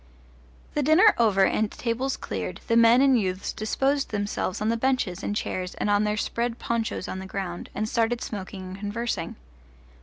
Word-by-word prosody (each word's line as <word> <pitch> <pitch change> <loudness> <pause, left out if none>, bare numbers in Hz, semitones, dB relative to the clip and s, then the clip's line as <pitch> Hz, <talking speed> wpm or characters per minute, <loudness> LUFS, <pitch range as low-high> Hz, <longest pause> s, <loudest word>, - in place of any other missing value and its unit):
The 295 - +1
dinner 315 +9 +6
over 205 -4 +4
and 215 +2 +1
tables 255 +3 -2
cleared, - - -5
the 230 - +1
men 230 +2 +6
and 265 -4 +5
youths 185 -1 -2
disposed 270 +6 0
themselves 205 -3 -2
on 215 - 0
the 230 - +2
benches 230 -7 0
and 205 - -2
chairs 185 -3 -3
and 205 - -1
on 205 +1 +3
their 210 0 0
spread 235 +2 -1
ponchos 230 -5 -2
on 190 - -4
the 190 - -7
ground, 190 -3 -5
and 215 +1 -1
started 235 +1 +1
smoking 195 -3 -6
and 185 +1 -8
conversing. 205 -3 -3
215 Hz, 180 wpm, -26 LUFS, 195-240 Hz, -, dinner